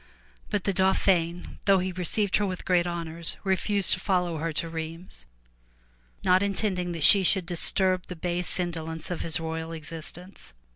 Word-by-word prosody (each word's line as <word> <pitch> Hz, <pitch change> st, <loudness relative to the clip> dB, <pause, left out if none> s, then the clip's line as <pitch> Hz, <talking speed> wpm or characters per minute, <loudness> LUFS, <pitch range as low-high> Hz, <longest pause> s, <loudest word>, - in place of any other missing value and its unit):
But 205 Hz, -3 st, -1 dB
the 200 Hz, -, 0 dB
Dauphin 180 Hz, -2 st, 0 dB
though 195 Hz, -1 st, +5 dB
he 185 Hz, 0 st, -2 dB
received 185 Hz, +3 st, +1 dB
her 210 Hz, -, 0 dB
with 185 Hz, -1 st, -6 dB
great 180 Hz, -1 st, +2 dB
honors, 170 Hz, -1 st, -4 dB
refused 195 Hz, +1 st, +1 dB
to -, -, -2 dB
follow 180 Hz, -4 st, 0 dB
her 165 Hz, +1 st, -2 dB
to 165 Hz, -, -1 dB
Rheims, 165 Hz, -, -7 dB, 1.0 s
not 185 Hz, +1 st, +4 dB
intending 195 Hz, -3 st, -1 dB
that 165 Hz, -3 st, -3 dB
she 200 Hz, -, +10 dB
should 190 Hz, 0 st, +2 dB
disturb 185 Hz, +1 st, 0 dB
the 180 Hz, -, -7 dB
base 175 Hz, +2 st, 0 dB
indo 170 Hz, -3 st, -3 dB
lence 160 Hz, +1 st, -6 dB
of 175 Hz, -, -3 dB
his 165 Hz, -1 st, -2 dB
royal 160 Hz, 0 st, -5 dB
existence. 165 Hz, -, -9 dB
180 Hz, 165 wpm, -26 LUFS, 165-190 Hz, 1.0 s, she